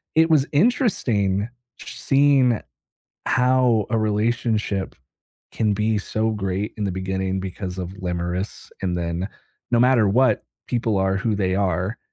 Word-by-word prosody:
it 160 +1 +5
was 145 -2 +4
interesting 120 - +1 0.3
sh - - -10
seeing 135 -4 +3 0.7
how 125 -4 +3
a 115 - +2
relationship 110 -2 0 0.6
can 105 -2 +1
be 105 +1 +1
so 110 +2 -1
great 100 0 -2
in 105 - -2
the 100 - -1
beginning 95 0 -2
because 95 0 -5
of 90 -1 -4
limerence 90 +2 -3
and 90 -2 0
then 85 +2 -2 0.4
no 120 - +4
matter 125 -4 +4
what, 125 +6 +3 0.2
people 115 -4 0
are 95 0 +1
who 110 0 0
they 95 -2 0
are 95 +2 -1
105 Hz, 140 wpm, -22 LUFS, 95-120 Hz, 0.7 s, it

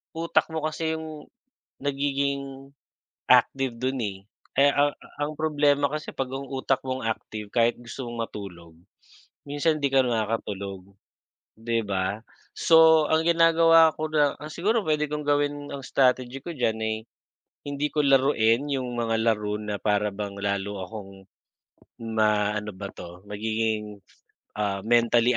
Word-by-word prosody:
Utak 165 +1 +1
mo 160 -1 -3
kasi 160 +1 -2
yung 155 -2 -9 0.5
nagiging 140 -1 -2 0.6
active 135 -2 +3
dun, 130 +2 -2
eh. 100 -5 -4 0.4
Eh, 140 +1 +6
ang 145 +1 +2 0.2
ang 145 +1 -1
problema 145 -2 +2
kasi 155 +1 -4
pag 130 -1 -3
ang 135 +1 -5
utak 135 0 0
mo'ng 130 0 -3
active 110 -1 -4
kahit 115 0 +3
gusto 120 +2 -7
mong 115 -1 -3
matulog, 85 -6 -10 0.7
minsan 145 +2 +1
hindi 140 - +2
ka 135 - +5
nakakatulog, 100 -4 -3 0.6
'di 115 +1 -1
ba. 95 +1 -2 0.4
So 160 -2 +6
ang 160 +1 +2
ginagawa 165 -1 +6
ko 155 0 -2
na 145 -2 +2
ah, 150 +1 -8
siguro 210 +8 +1
puwede 150 -2 0
kong 150 0 -4
gawin 145 0 0
ang 140 - -5
strategy 130 0 +1
ko 170 - -5
diyan 120 -7 0
ay, 110 0 0 0.7
hindi 145 +1 -1
ko 155 - -1
laruin 135 -2 +3
yung 130 -3 -2
mga 115 -1 0
laro 105 -2 0
na 105 -1 -4
para 105 0 +1
bang 100 0 -6
lalo 100 0 -2
akong 95 -2 -10 0.8
maano 105 -2 +1
ba 100 +1 -7
'to, 90 +1 -11
magiging 105 0 -2 0.5
ah, 100 -2 -1
mentally 120 +2 +3
125 Hz, 140 wpm, -26 LUFS, 105-145 Hz, 0.8 s, Eh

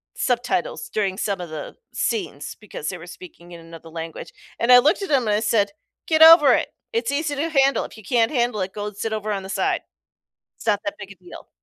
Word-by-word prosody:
subtitles 250 - -1
during 195 - -1
some 200 -3 -2
of 175 - -7
the 155 -2 -7 0.2
scenes 430 -5 -3
because - - -6
they - - -5
were - - -11
speaking 330 - -13
in 170 - -10
another 165 0 -12
language. 165 0 -8 0.3
And 235 - +2
I 250 - +10
looked 290 +9 +2
at 390 - -4
them 265 -6 +2
and 210 - +2
I - - +1
said, 210 -2 +1 0.4
"Get 315 -1 +2
over 320 -5 +9
it. - - 0 0.2
It's 230 +3 -1
easy 290 +1 -1
to 310 +4 -2
handle. 275 -3 +2
If - - -12
you 220 - -13
can't 230 +1 +1
handle 240 -6 0
it, 190 +1 -4
go 210 0 -5
sit 220 +2 -4
over 215 0 -3
on 195 -2 -3
the 190 - -9
side. 195 - 0 0.8
It's - - -13
not 205 -2 +3
that 200 - -3
big 200 -1 -9
a - - -12
deal." 175 - -12
220 Hz, 230 wpm, -22 LUFS, 195-275 Hz, 0.8 s, I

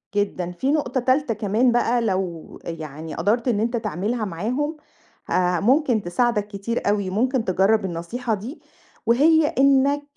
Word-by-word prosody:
جدًا، 190 -4 -1
في 260 +11 -1
نقطة 270 -4 0
تالتة 255 0 +1
كمان 215 +4 +1
بقى 240 0 +2
لو 185 -6 -3
آآ، - - -4
يعني 155 -1 -7
قدرت 230 +4 0
إن 215 -4 +2
أنت 235 +2 0
تعملها 215 +4 -2
معاهم، 245 - -2 0.5
آآ، 180 -1 +1
ممكن 255 0 +2
تساعدك 210 +3 0
كتير 205 +2 -3
أوي، 200 -2 0
ممكن 240 +4 0
تجرّب 195 +3 +2
النصيحة 205 +8 -3
دي، 250 - -6 0.4
وهي 300 +6 +4
إنّك 280 -1 +3
225 Hz, 150 wpm, -23 LUFS, 190-255 Hz, 0.5 s, وهي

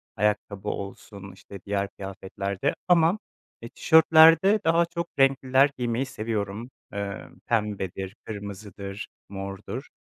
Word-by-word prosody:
ayakkabı 105 0 -1
olsun, 100 0 -7
işte, 95 +1 -12
diğer 100 -1 -1
kıyafetlerde 100 0 -4
ama 175 +1 +4 0.4
e, 115 - -8
tişörtlerde 160 - +6
daha 165 +1 +4
çok 170 0 -4
renkliler 135 0 +4
giymeyi 120 +1 -1
seviyorum. 110 -2 -4 0.2
Eee, 100 0 -5 0.2
pembedir, 100 -3 -2
kırmızıdır, 100 -1 -7 0.2
mordur. 100 +5 -6
105 Hz, 100 wpm, -26 LUFS, 100-135 Hz, 0.4 s, tişörtlerde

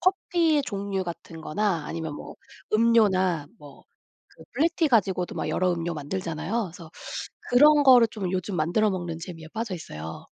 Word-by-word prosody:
커피의 345 -5 +2
종류 200 -4 -3
같은 165 -2 -8
거나 175 -2 -1
아니면 160 -2 -4
뭐 - - -9 0.4
음료나 200 -8 +3
뭐 145 -2 -15 0.5
그 - - -16
블랙티 330 +1 +2
가지고도 190 -7 +1
막 - - -3
여러 185 -1 +1
음료 170 0 -3
만들잖아요. 170 +7 -3
그래서 165 -2 -12 0.6
그런 295 +4 +6
거를 250 -4 +7
좀 200 -5 -4
요즘 185 0 -2
만들어 175 +8 +2
먹는 175 -4 -3
재미에 165 -2 -9
빠져 220 -3 -3
있어요. 80 - -8
185 Hz, 335 characters per minute, -26 LUFS, 165-230 Hz, 0.6 s, 거를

